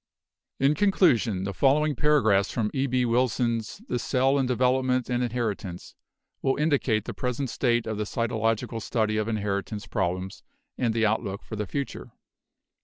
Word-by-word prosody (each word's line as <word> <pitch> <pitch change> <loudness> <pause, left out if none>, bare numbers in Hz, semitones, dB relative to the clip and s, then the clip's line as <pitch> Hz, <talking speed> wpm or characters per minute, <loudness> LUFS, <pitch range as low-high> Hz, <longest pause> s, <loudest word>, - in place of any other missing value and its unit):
In 135 +2 +4
conclusion, 140 - +2
the 100 0 -3
following 145 +4 +3
paragraphs 110 -9 +3
from 110 -4 -1
E. 135 0 0
B. 125 -1 +1
Wilson's 115 -2 0
'The 125 - -1
Cell 135 +3 +2
in 130 - +1
Development 125 0 +1
and 120 0 +1
Inheritance' 110 -7 -3 0.5
will 135 - +1
indicate 135 -8 +1
the - - -5
present 125 0 -3
state 120 -2 +1
of 110 -1 -3
the 105 - -1
cytological 115 0 -1
study 110 -1 0
of 110 0 -1
in 115 - 0
heritance 100 +1 -3
problems 95 -1 -2 0.3
and 115 -3 0
the 115 -1 +2
outlook 100 -2 -1
for 110 - -7
the 105 -1 -3
future. 140 -1 -5
120 Hz, 160 wpm, -26 LUFS, 105-130 Hz, 0.5 s, In